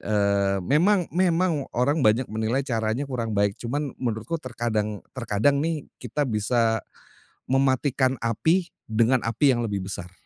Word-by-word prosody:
Eee, 100 -2 +1
memang 180 - +3
memang 175 -4 +1
orang 145 +6 +2
banyak 115 +1 +3
menilai 110 +5 0
caranya 115 +1 -1
kurang 115 -6 -3
baik, 100 0 +3
cuman 140 +3 -3
menurutku 125 +7 -2
terkadang 110 -4 -3
terkadang 130 +3 +1
nih, 160 -2 -2 0.2
kita 150 -1 -2
bisa 115 0 +1 0.7
mematikan 130 0 +1
api 160 - +1 0.2
dengan 115 +3 +2
api 120 +3 +3
yang 120 - -1
lebih 100 -3 -3
besar. 90 -2 -7
120 Hz, 135 wpm, -25 LUFS, 110-145 Hz, 0.7 s, memang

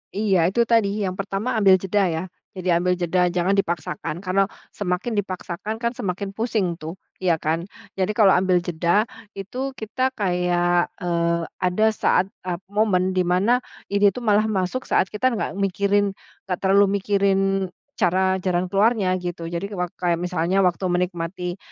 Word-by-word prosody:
Iya, 205 -2 +2
itu 235 +6 +2
tadi 215 -3 +1
yang 185 -1 -2
pertama 195 +5 -2
ambil 195 -2 +6
jeda 190 +1 +1
ya. 160 0 -2 0.3
Jadi 185 0 -2
ambil 180 +2 +2
jeda, 180 +1 +1
jangan 180 +2 +1
dipaksakan. 170 -1 -3
Karena 195 +1 +2 0.3
semakin 200 +4 -2
dipaksakan 185 +1 -4
kan 235 +1 -1
semakin 195 -2 -4
pusing 215 -5 -1
tuh, 160 +3 -6 0.3
iya 175 -3 +3
kan. 160 +3 -2 0.3
Jadi 190 +1 0
kalau 205 -4 +6
ambil 185 0 +3
jeda 175 +5 +1 0.3
itu 255 +8 -5
kita 255 +4 -1
kayak, 175 -3 +1
eee, 170 -1 0 0.2
ada 185 +4 +2
saat 190 - +2 0.2
ap 180 0 -4
momen 195 -3 +2
di 185 - +2
mana 200 +8 +3 0.3
ini 200 0 +5
tuh 250 - -6
malah 215 0 +3
masuk 195 +5 -2
saat - - +3
kita 215 +5 +1
nggak - - -2
mikirin, 200 +1 +1 0.3
nggak 180 -2 -1
terlalu 195 +1 +5
mikirin 200 -1 +2 0.6
cara 190 -1 +2
jalan 180 -1 -1
keluarnya 200 -2 +2
gitu. 175 -2 -5
Jadi 180 +4 -4
wak 180 -2 -2
kayak 175 -2 0
misalnya 180 +1 +1
waktu 185 0 +1
menikmati 180 0 -2
185 Hz, 160 wpm, -23 LUFS, 180-205 Hz, 0.6 s, ambil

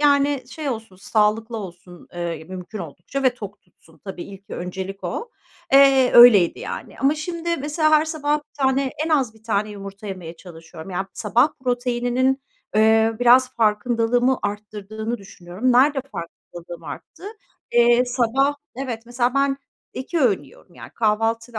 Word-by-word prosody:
yani, 285 -2 +3
şey 295 +1 -5
olsun, 220 -6 -5
sağlıklı 220 +3 0
olsun, 180 -3 -10
eee, 170 -2 -4
mümkün 185 +4 -8
oldukça 175 - -6
ve 255 -2 +3
tok 205 -3 -9
tutsun. 165 -2 -25
Tabii, 190 -3 -6
ilk, 195 0 -13
öncelik 190 +2 -6
o. 465 0 -4 0.4
Eee, 270 -2 +6
öyleydi, 220 -8 +8
yani. - - -7
Ama 275 +2 +2
şimdi, 335 +2 -3
mesela, 300 +2 0
her 310 0 +5
sabah 300 -2 0
1 300 0 -21
tane, 265 0 +2
en - - -3
az 265 -8 +1
1 220 - -21
tane 215 -1 -1
yumurta 200 +1 -9
yemeye 180 -4 -7
çalışıyorum. 165 0 -12
Yani, 190 +2 -3
sabah 235 +7 +2 0.2
proteininin, 245 +2 0 0.3
eee, 220 +1 +4
biraz 255 +1 +6
farkındalığımı 235 +3 +1
arttırdığını 210 +2 -5
düşünüyorum. 195 +5 -3
Nerede 270 +3 +4
farkındalığım 170 0 -9
arttı? - - -10 0.5
Eee, 240 +1 +5
sabah, 255 +3 +1 0.2
evet, 245 -4 -4
mesela, 245 +1 0
ben 275 0 +2 0.4
2 295 +6 -3
öğün 210 - +2
yiyorum. 145 +5 -19
Yani, - - -11
kahvaltı 225 +1 0
ve 220 - -4
230 Hz, 150 wpm, -22 LUFS, 195-265 Hz, 0.5 s, öyleydi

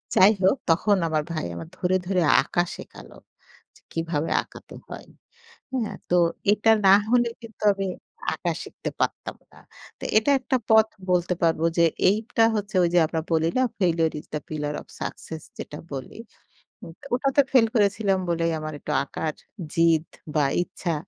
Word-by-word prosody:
যাই 195 +3 +7
হোক 190 +9 +4
তখন 200 +5 +3
আমার 155 -2 0
ভাই 155 - -3
আমার 160 - -8
ধরে, 180 +1 +1
ধরে 185 -1 +1 0.2
আঁকা 175 +5 0
শেখালো - - -12 0.8
কিভাবে 165 -2 -2
আঁকাতে - - -14
হয়, - - -9 0.7
হ্যাঁ। 240 -5 -2 0.2
তো - - +4 0.4
এটা 215 +1 +3 0.2
না 190 - +9 0.2
হলে 240 0 +3
কিন্তু 230 -1 -13
আমি 195 0 -3 0.5
আঁকা - - -2
শিখতে - - -6
পারতাম - - -2 0.2
না। - - -16 0.4
তো - - -11
এটা 220 +6 +3
একটা 260 0 0
পথ 220 0 +6 0.2
বলতে 180 0 +2
পারব 165 -1 +2 0.2
যে, 170 - +6 0.2
এইটা 220 +3 +1
হচ্ছে 205 -1 -4
ওই 170 - +3
যে 175 - +7
আমরা 160 +1 -2
বলি 160 0 +2
না 260 - +4 0.2
failure 165 -4 +2
is - - -15
the 150 - -1
pillar 150 -1 -3
of - - -17
success 160 -1 -6 0.2
যেটা 150 - -7
বলি। 135 -2 -7 0.6
হুম, - - -10 0.2
ওটা 265 +2 -1
তো - - +9
ফেইল 250 -4 +5
করেছিলাম 205 -2 +2
বলেই 165 0 +1
আমার 155 0 -5
একটু 150 - -5
আঁকার 155 -1 -4 0.4
জিদ 165 -1 +3 0.3
বা 150 -2 +3 0.2
ইচ্ছা 175 -1 -4
175 Hz, 165 wpm, -24 LUFS, 160-215 Hz, 0.8 s, না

